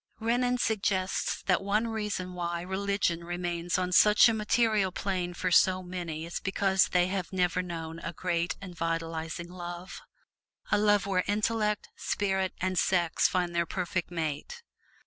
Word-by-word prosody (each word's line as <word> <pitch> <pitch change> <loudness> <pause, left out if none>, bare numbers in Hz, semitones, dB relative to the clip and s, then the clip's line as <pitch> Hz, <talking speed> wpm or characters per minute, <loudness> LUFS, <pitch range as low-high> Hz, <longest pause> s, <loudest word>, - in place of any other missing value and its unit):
Renan 245 +2 +1
suggests 195 -5 0
that 185 -1 +2
one 210 +4 +1
reason 210 -5 -3
why 170 -1 -3
religion 190 -2 -1
remains 175 0 -2
on 180 -1 -1
such 210 +5 +7
a 230 - +2
material 215 -2 +2
plane 185 -2 -2
for 185 +1 -1 0.3
many 175 -3 -5
is 170 - -4
because 190 0 +2
they 180 -1 +3
have 185 -2 -3
never 180 -1 +1
known 165 -2 -6
a 165 - -5
great 170 0 -1
and 185 -3 -9
vitalizing 165 0 -3
love 175 +1 -7 0.7
a - - +5
love 205 -2 +3
where 185 -2 +1
intellect, 210 +1 0
spirit 190 -2 -1
and 185 0 0
sex 175 -3 +2
find 180 -1 -1
their 170 0 +1
perfect 180 -1 -2
mate. 165 - -4
185 Hz, 145 wpm, -29 LUFS, 175-200 Hz, 0.7 s, such